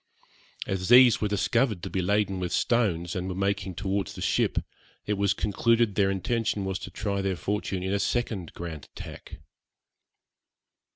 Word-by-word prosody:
As 95 0 -2
these 125 -1 +7
were 105 - +2
discovered 105 0 +1
to 95 - -4
be 95 - 0
laden 100 0 +1
with 90 -1 -3
stones, 90 -8 +1
and 90 0 -2
were 90 - -4
making 100 -1 -1
towards 95 0 -2
the - - -8
ship, - - +1 0.5
it 105 - 0
was 100 0 +1
concluded 115 +2 +2
their 95 0 +2
intention 105 +1 -1
was 95 0 -2
to - - -7
try 100 +2 -2
their 95 -1 -1
fortune 95 0 -2
in 95 +1 -1
a 100 - +1
second 100 -4 -1
grand 80 -4 -6
attack. - - -10
100 Hz, 165 wpm, -27 LUFS, 95-105 Hz, 0.5 s, these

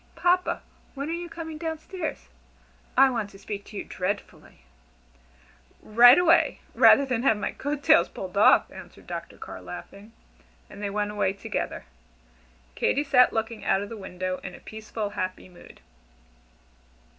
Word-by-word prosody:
Papa, 360 +1 +1 0.3
when 280 +3 -4
are - - -2
you 345 0 -5
coming 320 -2 -7
down 320 0 -3
stairs? 320 -1 -6 0.7
I 270 -1 +6
want 225 -4 -3
to 195 - -15
speak 200 0 -7
to 210 - -10
you - - -3
dreadfully." 195 +2 -5 1.2
"Right 240 +4 +7
away 345 -1 +3
rather 280 - +6
than 250 -4 -1
have 230 -5 +3
my 210 - -3
coat 290 0 -4
tails - - +5
pulled - - -8
off," - - +5
answered - - -13
Dr. - - -7
Carr, - - -9
laughing, 200 +3 -10 0.6
and 205 - -10
they 205 - -2
went 205 +1 -2
away 195 -2 0
together. 200 - -4 0.9
Katy 285 - +1
sat 265 -3 +5
looking 225 0 -3
out 195 - +1
of 205 - -8
the 230 - -7
window 185 -2 -5
in 180 - -7
a - - -13
peaceful, 220 -1 -6
happy 185 -3 -4
mood. 180 -1 -16
225 Hz, 155 wpm, -26 LUFS, 200-290 Hz, 1.2 s, Right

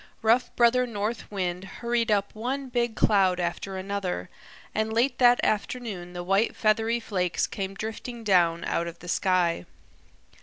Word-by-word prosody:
Rough 230 +3 +3
Brother 245 +1 +4
North 215 0 -2
Find 185 -3 -2
hurried 235 +3 -2
up 200 -1 +1
one 260 +5 -3
big 240 -2 0
cloud 190 -3 +3
after 180 +2 -3
another, 190 - -3 0.4
and 220 0 0
late 245 +3 +1
that 245 -1 +6
afternoon 210 -5 -2
the 175 0 -5
white 195 +5 +1
feathery 225 +2 +2
flakes 185 -6 -1
came 195 -1 -5
drifting 225 +2 -6
down 175 -5 +3
out 170 - -1
of 170 0 -7
the 175 - -12
sky. 175 - +1
210 Hz, 150 wpm, -26 LUFS, 185-235 Hz, 0.4 s, that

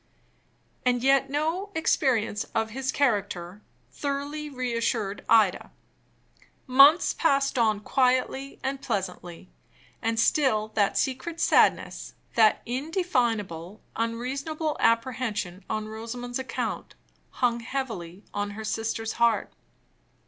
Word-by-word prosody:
And 245 -1 +1
yet 270 0 +4
no 320 +8 -1
experience 245 -9 +1
of 225 0 0
his 265 +2 -2
character 205 -7 -1 0.3
thoroughly 290 +2 -4
re 255 -3 -3
assured 220 -3 -1
Ida. 215 -5 +4 1.0
Months 275 +6 +6
passed 275 -4 +2
on 215 -3 +2
quietly 260 +3 0
and 270 +1 -2
pleasantly; 180 -2 -4 0.5
and 225 0 0
still 230 -5 +2
that 205 -2 +1
secret 270 +6 -2
sadness, - - +2 0.2
that 220 -2 +4
indefinable, 240 - -1 0.2
unreasonable 275 +7 -2
apprehension 230 -6 0
on 215 0 -2
Rosamond's 240 +3 -5
account, 260 - -4 0.3
hung 240 -2 0
heavily 220 -8 -5
on 205 0 -2
her 220 - -5
sister's 225 +1 -2
heart. 235 -1 +2
240 Hz, 105 wpm, -26 LUFS, 215-275 Hz, 1.0 s, Months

